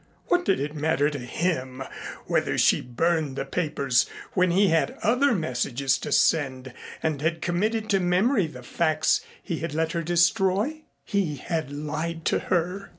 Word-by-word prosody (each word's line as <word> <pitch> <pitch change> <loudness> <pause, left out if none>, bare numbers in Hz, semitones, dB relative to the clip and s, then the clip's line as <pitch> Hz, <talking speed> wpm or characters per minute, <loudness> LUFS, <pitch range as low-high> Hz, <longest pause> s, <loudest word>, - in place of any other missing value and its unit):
What 355 0 +3
did 190 - +2
it 145 +2 -3
matter 150 -1 +1
to 145 - -5
him 130 -1 -2 0.4
whether - - 0
she - - +4
burned 155 +3 0
the 135 - -3
papers 140 -5 0 0.2
when 185 -1 +3
he 190 +3 +4
had 165 -1 +1
other 250 +3 +3
messages 135 -4 0
to - - -5
send 130 -5 +1 0.3
and 155 -3 -1
had 165 +2 0
committed 215 +6 -1
to 195 - +4
memory 185 +3 +2
the 125 -5 -11
facts 155 +2 +1 0.2
he 170 -5 -3
had 160 -2 -4
let 160 0 0
her 170 - -1
destroy? 190 - +1 0.2
He 195 -8 -1
had 160 +1 -3
lied 155 +3 -4
to - - +2
her. 180 +3 -1
165 Hz, 160 wpm, -25 LUFS, 145-185 Hz, 0.4 s, she